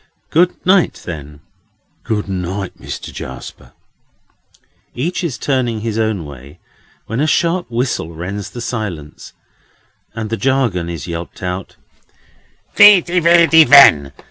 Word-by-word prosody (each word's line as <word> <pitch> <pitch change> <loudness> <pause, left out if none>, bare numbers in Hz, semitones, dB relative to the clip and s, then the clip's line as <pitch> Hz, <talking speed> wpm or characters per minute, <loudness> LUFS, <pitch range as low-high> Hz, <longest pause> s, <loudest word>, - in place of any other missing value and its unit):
"Good 175 +3 +2
night, 185 -1 +2
then." 75 -3 -8 0.6
"Good 105 -2 -3
night, 95 0 -5
Mister - - -8
Jarsper." 65 0 -10 1.2
Each 165 +9 -3
is 160 -8 -3
turning 125 -5 -1
his 115 0 -3
own 110 -7 -1
way, 70 +2 -12 0.5
when 115 +3 -4
a 150 - +1
sharp 170 +2 0
whistle 120 -8 -2
rends 90 +5 -6
the 120 - -9
silence, 100 - -6 0.8
and 110 -1 -5
the 115 - -1
jargon 125 -11 0
is 85 -3 -6
yelped 85 +1 -7
out: 90 +1 -5 1.0
Widdy 185 -4 +6
widdy 170 -1 +6
wen! 140 - +6
110 Hz, 120 wpm, -16 LUFS, 85-145 Hz, 1.2 s, Widdy